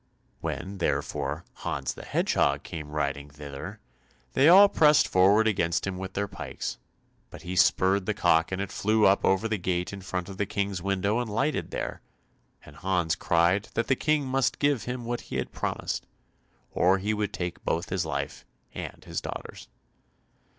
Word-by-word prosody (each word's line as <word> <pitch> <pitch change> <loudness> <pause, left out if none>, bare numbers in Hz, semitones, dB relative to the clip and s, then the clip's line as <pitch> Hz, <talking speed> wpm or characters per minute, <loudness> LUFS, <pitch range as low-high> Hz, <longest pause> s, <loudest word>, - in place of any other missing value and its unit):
When, 95 +2 -5
therefore, 75 -1 -1
Hans 65 -2 -3
the - - -10
Hedgehog - - +1
came 80 -3 -7
riding 70 -1 -2
thither, 70 -1 -8 0.5
they 140 +4 +5
all 195 +3 +9
pressed 150 -5 +5
forward 100 +4 +5
against 90 -5 +1
him 95 -1 -3
with 95 0 -6
their 100 +1 -1
pikes, - - -6 0.5
but - - -11
he 90 +1 -4
spurred 95 +2 +3
the - - 0
cock 80 +2 +3
and 95 - -2
it 100 -1 -3
flew 110 +1 +2
up 95 +1 +4
over 95 +3 +2
the 110 -2 -1
gate 90 +1 -1
in 100 - -7
front 90 -1 -4
of 95 -1 -8
the 105 - -1
King's 100 -2 -2
window 100 +4 0
and 120 -2 -3
lighted 135 +7 -1
there, - - -4 0.6
and 75 - -14
Hans 90 -2 0
cried 85 +5 +2
that 115 - +1
the 135 - +4
King 150 +1 +1
must 135 0 +1
give 145 -4 +1
him 125 -1 -4
what 120 +1 -2
he - - -8
had - - -2
promised, - - -3 0.6
or 95 +2 +3
he 105 +3 -1
would 105 -1 -1
take 90 -1 -5
both 85 - -1
his 95 -2 0
life 80 -4 -4 0.3
and - - -7
his - - -3
daughter's. - - -7
95 Hz, 180 wpm, -27 LUFS, 85-110 Hz, 0.6 s, all